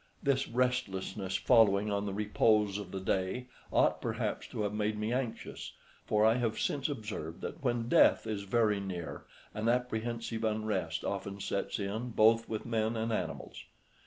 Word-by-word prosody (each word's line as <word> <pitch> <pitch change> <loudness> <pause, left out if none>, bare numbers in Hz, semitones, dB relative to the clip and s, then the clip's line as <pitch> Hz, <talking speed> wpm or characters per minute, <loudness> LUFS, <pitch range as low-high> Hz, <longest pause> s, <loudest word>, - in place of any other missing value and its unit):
This 140 -2 +2
restlessness, 105 -6 -1
following 105 -4 +4
on 100 0 -1
the 100 - -3
repose 105 -1 +2
of 100 -3 -7
the 95 - -4
day, 95 +7 -1 0.2
ought - - +3
perhaps - - -2
to 105 - -3
have 105 0 -1
made 105 0 0
me 105 +2 -1
anxious, 125 -3 -4 0.3
for 105 0 +3
I 110 +2 +5
have 115 -3 0
since 145 0 0
observed 105 - -5
that 160 - -6
when 120 -3 0
death - - +5
is 105 -2 -2
very 105 0 +2
near 90 -7 -5 0.3
an 110 +2 0
apprehensive 115 -1 -1
unrest 105 -6 -1
often 100 0 -3
sets 100 - -2
in 110 +4 -3
both 115 0 +4
with 110 -1 -3
men 115 0 0
and 110 +1 -1
animals. - - -4
110 Hz, 160 wpm, -32 LUFS, 100-115 Hz, 0.3 s, I